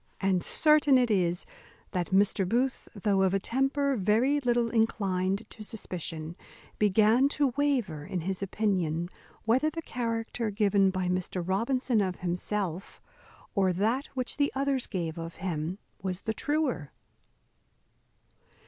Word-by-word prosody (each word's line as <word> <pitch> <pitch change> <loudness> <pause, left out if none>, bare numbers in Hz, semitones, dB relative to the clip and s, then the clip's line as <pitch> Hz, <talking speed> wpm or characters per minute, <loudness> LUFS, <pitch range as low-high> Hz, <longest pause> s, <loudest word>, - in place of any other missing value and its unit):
And 190 -2 +1
certain 300 -3 +4
it 245 -2 +2
is, 180 -3 +1 0.5
that 180 -3 -2
Mr. 195 -1 +3
Booth, 255 +4 0
though 200 -1 +1
of 190 0 +3
a - - +2
temper 270 +5 +1
very 230 +8 +2
little 240 -3 +1
inclined 195 -3 0
to 225 - -12
suspicion, 170 -6 -5 0.4
began 215 +6 +4
to 285 -3 +1
waver 250 - 0
in 180 +3 -3
his 190 +3 -2
opinion 180 -5 -1 0.4
whether 255 +7 +3
the 330 +1 -6
character 230 -2 -2
given 200 -2 +3
by 185 -1 -1
Mr. 180 -1 -2
Robinson 235 +4 +1
of 185 -2 -2
himself, 180 +1 -3 0.5
or 190 -2 +3
that 225 - 0
which 255 -1 -3
the 285 -1 +2
others 275 -1 0
gave 170 -4 -3
of 165 0 -6
him, 170 0 -3 0.2
was 185 0 -3
the 220 - -2
truer. 280 - -1
205 Hz, 135 wpm, -29 LUFS, 185-250 Hz, 0.5 s, certain